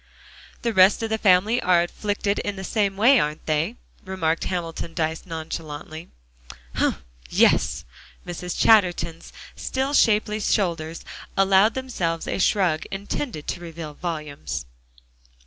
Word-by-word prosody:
"The 235 Hz, -1 st, 0 dB
rest 190 Hz, +3 st, +5 dB
of 225 Hz, -, -3 dB
the 220 Hz, -, 0 dB
family 205 Hz, +5 st, +4 dB
are 175 Hz, -1 st, +4 dB
afflicted 205 Hz, +2 st, -2 dB
in 205 Hz, -, -3 dB
the 190 Hz, -, -7 dB
same 200 Hz, -1 st, 0 dB
way, 250 Hz, +6 st, +6 dB
aren't 150 Hz, +1 st, -2 dB
they?" 160 Hz, +8 st, 0 dB, 0.3 s
remarked 170 Hz, -4 st, -1 dB
Hamilton 170 Hz, -2 st, -4 dB
Dyce 160 Hz, +2 st, -2 dB
nonchalantly. 160 Hz, -1 st, -6 dB, 0.6 s
"Humph! -, -, 0 dB, 0.3 s
yes." -, -, +3 dB, 0.4 s
Mrs. 180 Hz, 0 st, -5 dB
Chatterton's 175 Hz, -6 st, +3 dB, 0.2 s
still 265 Hz, +2 st, -2 dB
shapely 215 Hz, -4 st, +3 dB
shoulders 170 Hz, -6 st, -1 dB, 0.3 s
allowed 195 Hz, +3 st, +4 dB
themselves 180 Hz, -11 st, -2 dB
a -, -, -2 dB
shrug 185 Hz, -5 st, +2 dB
intended 200 Hz, -, -4 dB
to -, -, -3 dB
reveal 165 Hz, -3 st, -7 dB
volumes. 145 Hz, -, -5 dB
180 Hz, 125 wpm, -24 LUFS, 160-205 Hz, 0.6 s, way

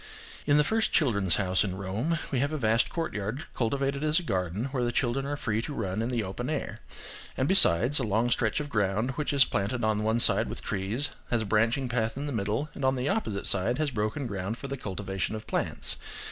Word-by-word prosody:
In 145 Hz, 0 st, +5 dB
the 150 Hz, -, +5 dB
first 220 Hz, +7 st, +1 dB
"Children's 100 Hz, -, +2 dB
House" 95 Hz, -1 st, +1 dB
in 95 Hz, -3 st, -3 dB
Rome 105 Hz, -, -1 dB
we 130 Hz, -, 0 dB
have 140 Hz, +3 st, 0 dB
a 155 Hz, -, -2 dB
vast 115 Hz, -2 st, +2 dB
courtyard, 125 Hz, -, -3 dB
cultivated 140 Hz, +4 st, -1 dB
as 155 Hz, +2 st, +3 dB
a -, -, -7 dB
garden, 95 Hz, -, -2 dB
where 130 Hz, -3 st, -1 dB
the 120 Hz, -, 0 dB
children 135 Hz, +2 st, 0 dB
are 145 Hz, 0 st, -3 dB
free 110 Hz, -4 st, -1 dB
to 145 Hz, +4 st, -5 dB
run 100 Hz, -2 st, -2 dB
in 115 Hz, -, -1 dB
the 120 Hz, -3 st, -1 dB
open 105 Hz, +7 st, -4 dB
air–and, 140 Hz, -2 st, -5 dB
besides, 140 Hz, -, +6 dB
a -, -, -1 dB
long 110 Hz, +3 st, +1 dB
stretch 110 Hz, 0 st, +1 dB
of 150 Hz, -, -4 dB
ground, 105 Hz, 0 st, 0 dB
which 150 Hz, +3 st, -2 dB
is 140 Hz, -3 st, +5 dB
planted 115 Hz, +3 st, -2 dB
on 110 Hz, -1 st, +1 dB
one 110 Hz, +2 st, +1 dB
side -, -, +4 dB
with -, -, -7 dB
trees, 105 Hz, +8 st, -1 dB, 0.2 s
has 115 Hz, -2 st, +1 dB
a -, -, -6 dB
branching 115 Hz, +5 st, +1 dB
path 115 Hz, -1 st, -1 dB
in 140 Hz, -, -3 dB
the 145 Hz, -, -3 dB
middle, 110 Hz, +5 st, -1 dB
and 140 Hz, -, -7 dB
on 130 Hz, 0 st, +3 dB
the 130 Hz, +1 st, -1 dB
opposite 195 Hz, -, -2 dB
side, 105 Hz, +6 st, +4 dB
has 155 Hz, -2 st, 0 dB
broken 110 Hz, +5 st, -2 dB
ground 100 Hz, 0 st, -4 dB
for 140 Hz, -, -7 dB
the 135 Hz, -, -4 dB
cultivation 100 Hz, -3 st, -4 dB
of 110 Hz, -, -7 dB
plants. -, -, 0 dB
120 Hz, 225 wpm, -28 LUFS, 105-140 Hz, 0.2 s, besides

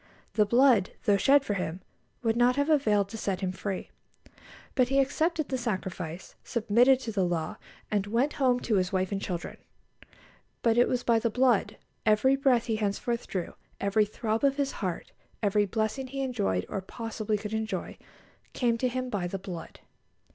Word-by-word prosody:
The 210 Hz, -2 st, +3 dB
blood, 240 Hz, -4 st, +4 dB
though 205 Hz, -, +4 dB
shed 275 Hz, +7 st, +4 dB
for 205 Hz, -, -1 dB
him, 180 Hz, -2 st, -3 dB, 0.4 s
would 225 Hz, -1 st, +2 dB
not 245 Hz, +1 st, +4 dB
have 285 Hz, +3 st, +1 dB
availed 210 Hz, -9 st, +3 dB
to 225 Hz, -, -7 dB
set 195 Hz, -2 st, -2 dB
him 185 Hz, -1 st, -1 dB
free. 190 Hz, 0 st, -5 dB, 0.8 s
But 255 Hz, -2 st, +3 dB
he 270 Hz, +2 st, +2 dB
accepted 310 Hz, +3 st, +1 dB
the 260 Hz, -1 st, -1 dB
sacrifice, 185 Hz, -6 st, -4 dB
submitted 240 Hz, +3 st, +3 dB
to 235 Hz, -, -4 dB
the 200 Hz, -3 st, +1 dB
law, 170 Hz, -3 st, -2 dB, 0.3 s
and 205 Hz, -1 st, 0 dB
went 245 Hz, +7 st, +1 dB
home 250 Hz, -2 st, +4 dB
to 215 Hz, -4 st, +1 dB
his 185 Hz, -1 st, 0 dB
wife 185 Hz, 0 st, 0 dB
and 195 Hz, -1 st, -2 dB
children; 175 Hz, -3 st, -4 dB, 1.1 s
but 230 Hz, -1 st, +4 dB
it 240 Hz, +1 st, +5 dB
was 250 Hz, -1 st, -1 dB
by 230 Hz, -1 st, +3 dB
the 230 Hz, -, 0 dB
blood; 250 Hz, -1 st, +2 dB, 0.3 s
every 220 Hz, +5 st, +4 dB
breath 260 Hz, -4 st, +2 dB
he 220 Hz, -2 st, -1 dB
henceforth 220 Hz, +3 st, -2 dB
drew, 180 Hz, -3 st, -4 dB, 0.3 s
every 200 Hz, +2 st, +2 dB
throb 220 Hz, +2 st, -2 dB
of 275 Hz, 0 st, +3 dB
his 280 Hz, -1 st, 0 dB
heart, 185 Hz, -5 st, -4 dB, 0.3 s
every 205 Hz, 0 st, +2 dB
blessing 220 Hz, +6 st, -2 dB
he 270 Hz, +1 st, -3 dB
enjoyed, 95 Hz, -, -1 dB
or 195 Hz, -, -3 dB
possibly 220 Hz, +1 st, -3 dB
could 210 Hz, +1 st, -6 dB
enjoy, 220 Hz, 0 st, -3 dB, 0.6 s
came 235 Hz, -2 st, +1 dB
to 255 Hz, -, +2 dB
him 255 Hz, +1 st, -2 dB
by 200 Hz, -7 st, -2 dB
the 195 Hz, -, -4 dB
blood. 185 Hz, -3 st, -8 dB
220 Hz, 180 wpm, -28 LUFS, 195-250 Hz, 1.1 s, it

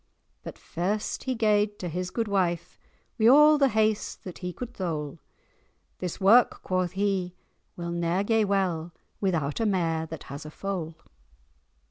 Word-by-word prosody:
But -, -, -8 dB
first 200 Hz, +5 st, -3 dB
he 260 Hz, -1 st, -1 dB
gaed 210 Hz, -2 st, +2 dB
to 180 Hz, -, -5 dB
his 180 Hz, +2 st, -3 dB
gude 230 Hz, +4 st, -1 dB
wyfe, 180 Hz, -5 st, -1 dB, 0.4 s
Wi' 220 Hz, -, +5 dB
a' 300 Hz, +4 st, +7 dB
the 275 Hz, -, +5 dB
haste 215 Hz, -1 st, 0 dB
that 185 Hz, -, -8 dB
he 180 Hz, -1 st, -4 dB
could 245 Hz, +6 st, -7 dB
thole[#] 160 Hz, -6 st, -4 dB, 0.8 s
'This 180 Hz, -2 st, -4 dB
wark,' 225 Hz, +5 st, +5 dB
quo' 185 Hz, -1 st, 0 dB
he, 190 Hz, -1 st, -1 dB, 0.4 s
'will 170 Hz, -1 st, -4 dB
ne'er 170 Hz, +2 st, 0 dB
gae 225 Hz, +1 st, +2 dB
well 180 Hz, -5 st, 0 dB, 0.3 s
Without 160 Hz, -7 st, -1 dB
a 225 Hz, -, +1 dB
mare 165 Hz, -5 st, 0 dB
that 160 Hz, -1 st, -8 dB
has 140 Hz, +1 st, -8 dB
a 155 Hz, -, -8 dB
foal. 170 Hz, -2 st, -4 dB
185 Hz, 155 wpm, -27 LUFS, 170-210 Hz, 0.8 s, a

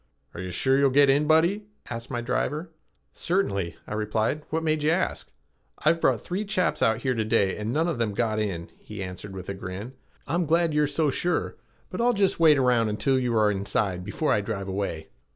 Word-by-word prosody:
"Are 85 Hz, -, -6 dB
you 90 Hz, -, -5 dB
sure 135 Hz, +7 st, +2 dB
you'll 140 Hz, -1 st, +4 dB
get 140 Hz, +1 st, +5 dB
in, 145 Hz, +2 st, +2 dB
buddy?" 170 Hz, +7 st, +3 dB, 0.2 s
asked 115 Hz, -1 st, -6 dB
my 120 Hz, -, -2 dB
driver. 150 Hz, +7 st, -2 dB, 0.4 s
"Certainly," 100 Hz, -, -1 dB
I -, -, -6 dB
replied. 110 Hz, +6 st, -1 dB
"What 160 Hz, +1 st, -1 dB
made 155 Hz, -1 st, +1 dB
you 150 Hz, -, +2 dB
ask?" 175 Hz, +3 st, -1 dB, 0.5 s
"I've 165 Hz, +2 st, +2 dB
brought -, -, +2 dB
three 185 Hz, +3 st, -3 dB
chaps 195 Hz, -4 st, 0 dB
out 110 Hz, +1 st, +2 dB
here 130 Hz, -2 st, +1 dB
to 115 Hz, -2 st, -1 dB
day 105 Hz, -3 st, +2 dB
and 105 Hz, +2 st, -3 dB
none 160 Hz, +6 st, +1 dB
of 165 Hz, -8 st, -2 dB
them 110 Hz, -3 st, -1 dB
got 110 Hz, -1 st, 0 dB
in," 90 Hz, -6 st, -3 dB
he 105 Hz, -2 st, -7 dB
answered 95 Hz, +1 st, -8 dB
with 95 Hz, -1 st, -8 dB
a 100 Hz, -, -3 dB
grin. 95 Hz, +6 st, -7 dB, 0.3 s
"I'm 170 Hz, +2 st, -1 dB
glad 165 Hz, 0 st, +2 dB
you're 150 Hz, 0 st, +3 dB
so 145 Hz, 0 st, +1 dB
sure, 175 Hz, +6 st, -1 dB, 0.4 s
but -, -, -3 dB
I'll 245 Hz, +1 st, +3 dB
just 200 Hz, -5 st, +1 dB
wait 155 Hz, -3 st, +6 dB
around 125 Hz, -4 st, +3 dB
until 130 Hz, +5 st, +1 dB
you 120 Hz, -3 st, 0 dB
are 105 Hz, -1 st, +4 dB
inside 95 Hz, -2 st, -1 dB
before 105 Hz, -, 0 dB
I 105 Hz, -, +2 dB
drive 100 Hz, -2 st, -4 dB
away." 95 Hz, -5 st, -3 dB
125 Hz, 210 wpm, -26 LUFS, 105-160 Hz, 0.5 s, wait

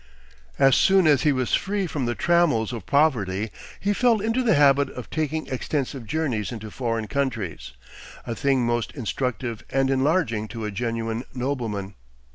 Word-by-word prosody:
As 135 Hz, -1 st, +5 dB
soon 190 Hz, -2 st, +4 dB
as 145 Hz, -4 st, +5 dB
he 150 Hz, -, +3 dB
was 130 Hz, -3 st, -1 dB
free 195 Hz, +1 st, +1 dB
from 145 Hz, -7 st, -2 dB
the 120 Hz, -, -1 dB
trammels 160 Hz, -10 st, +2 dB
of 110 Hz, -6 st, -7 dB
poverty 110 Hz, -9 st, +1 dB, 0.3 s
he 205 Hz, +1 st, +1 dB
fell 235 Hz, 0 st, +3 dB
into 225 Hz, +5 st, 0 dB
the 225 Hz, -7 st, +3 dB
habit 140 Hz, -1 st, +4 dB
of 125 Hz, -3 st, -9 dB
taking 155 Hz, 0 st, -1 dB
extensive 130 Hz, -2 st, -3 dB
journeys 125 Hz, -7 st, -1 dB
into 110 Hz, -3 st, -7 dB
foreign 115 Hz, -2 st, -2 dB
countries, 115 Hz, -, -3 dB, 0.5 s
a 120 Hz, -, -3 dB
thing 135 Hz, -1 st, +1 dB
most 120 Hz, -1 st, -1 dB
instructive 125 Hz, -2 st, -3 dB
and 135 Hz, 0 st, +1 dB
enlarging 135 Hz, -6 st, +1 dB
to 115 Hz, 0 st, -6 dB
a 105 Hz, -, -3 dB
genuine 115 Hz, +1 st, -2 dB
nobleman. 115 Hz, -7 st, -3 dB
130 Hz, 160 wpm, -24 LUFS, 115-150 Hz, 0.5 s, As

